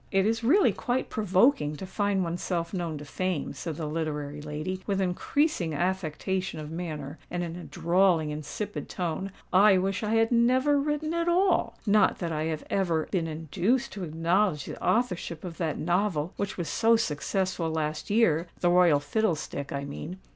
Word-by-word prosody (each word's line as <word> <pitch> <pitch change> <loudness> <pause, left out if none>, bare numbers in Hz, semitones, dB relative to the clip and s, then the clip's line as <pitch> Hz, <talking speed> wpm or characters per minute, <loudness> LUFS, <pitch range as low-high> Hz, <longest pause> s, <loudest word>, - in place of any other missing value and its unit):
"It 195 -1 +3
is 225 +2 0
really 335 - +5
quite 250 +1 -2
provoking 195 - +3
to 190 - -7
find 200 0 0
oneself 170 0 -2
known 170 -4 -2
to 145 - -8
Fame," 185 +1 -2
said 155 +3 -5
the 155 - -4
literary 150 -2 -3
lady, 155 +5 -4
with 195 -2 0
increasing 185 - 0
affectation 185 +1 -2
of 150 0 -7
manner, 155 -4 -5
and 175 0 -2
in 170 -1 -5
a 175 - -8
drawling, 170 -2 +2
insipid 155 +8 -5
tone. 180 +2 -3 0.2
"I 195 +1 +7
wish 190 +1 0
I 215 0 0
had 225 +1 +3
never 255 +5 +4
written 300 +2 -1
at 335 0 0
all:—not 235 - +2
that 170 -2 -3
I 155 0 -1
have 160 -1 -3
ever 170 -5 0
been 175 -4 0
induced 165 - -1
to 200 - -6
acknowledge 165 0 +1
the - - -8
authorship 180 -8 0
of 175 -3 -7
that 160 -4 -1
novel 175 -2 0
which 200 -1 -3
was 175 -3 -3
so 230 0 +3
successful 185 -2 -1
last 155 -1 -2
year—'The 175 -5 +2
Royal 175 -5 +5
Fiddlestick,' 145 -3 -2
I 140 0 -3
mean. 150 +5 -6
180 Hz, 170 wpm, -28 LUFS, 155-210 Hz, 0.2 s, I